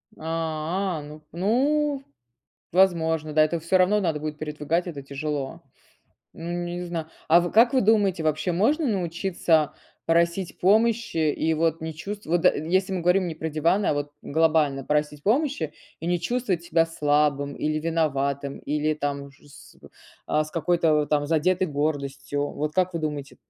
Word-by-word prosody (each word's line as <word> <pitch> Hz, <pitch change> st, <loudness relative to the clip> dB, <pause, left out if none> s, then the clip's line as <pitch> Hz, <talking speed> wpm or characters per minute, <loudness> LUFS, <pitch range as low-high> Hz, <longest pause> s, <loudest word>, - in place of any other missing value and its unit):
А, 165 Hz, +2 st, -2 dB
ну. 150 Hz, +1 st, -11 dB
Ну, 275 Hz, -, +1 dB, 0.7 s
возможно. 160 Hz, -4 st, +2 dB
Да, 155 Hz, -, +5 dB
это 165 Hz, +2 st, 0 dB
всё 170 Hz, +4 st, +2 dB
равно 190 Hz, +3 st, +3 dB
надо 165 Hz, -5 st, 0 dB
будет 150 Hz, 0 st, -5 dB
передвигать, 155 Hz, +3 st, -2 dB
это 150 Hz, -5 st, -6 dB
тяжело. 140 Hz, 0 st, -4 dB, 0.7 s
Ну, 165 Hz, +1 st, -6 dB
не 175 Hz, 0 st, -4 dB
зна 165 Hz, -2 st, -5 dB, 0.2 s
А 170 Hz, +2 st, +7 dB
в 175 Hz, 0 st, -2 dB
как 235 Hz, +4 st, +5 dB
вы 260 Hz, -, +4 dB
думаете, 200 Hz, -5 st, +3 dB
вообще, 155 Hz, +3 st, 0 dB
можно 275 Hz, -, +2 dB
научиться 170 Hz, -, +1 dB, 0.3 s
просить 170 Hz, +2 st, +1 dB
помощи 215 Hz, -5 st, +2 dB
и 160 Hz, +2 st, 0 dB
вот 165 Hz, 0 st, 0 dB
не 160 Hz, 0 st, -5 dB
чувств 200 Hz, +6 st, -7 dB
вот 170 Hz, +2 st, 0 dB
если 185 Hz, +5 st, +2 dB
мы 185 Hz, -2 st, -2 dB
говорим 180 Hz, +1 st, +3 dB
не 160 Hz, -, -4 dB
про 160 Hz, 0 st, -3 dB
диваны, 170 Hz, +6 st, +1 dB
а -, -, +2 dB
вот 145 Hz, 0 st, -3 dB
глобально 155 Hz, -3 st, +2 dB
просить 150 Hz, -1 st, -1 dB
помощи, 230 Hz, -, 0 dB, 0.3 s
и 165 Hz, -, -5 dB
не 175 Hz, 0 st, +1 dB
чувствовать 200 Hz, -6 st, -1 dB
себя 165 Hz, 0 st, +2 dB
слабым, 145 Hz, -2 st, +1 dB
или 155 Hz, 0 st, -1 dB
виноватым, 140 Hz, -4 st, -1 dB
или 150 Hz, +1 st, -1 dB
там 145 Hz, -1 st, -3 dB
уже 140 Hz, +1 st, -15 dB
с -, -, -16 dB
в -, -, -15 dB, 0.4 s
а, 155 Hz, -, +2 dB
с 155 Hz, -, -11 dB
какой-то 165 Hz, 0 st, +2 dB
вот 150 Hz, -1 st, +1 dB
там 145 Hz, -1 st, +1 dB
задетой 180 Hz, +4 st, +2 dB
гордостью. 145 Hz, -1 st, -2 dB
Вот 150 Hz, +1 st, -3 dB
как 185 Hz, -1 st, +1 dB
вы 165 Hz, -, -2 dB
думаете, 150 Hz, -3 st, -4 dB
160 Hz, 165 wpm, -25 LUFS, 150-180 Hz, 0.7 s, А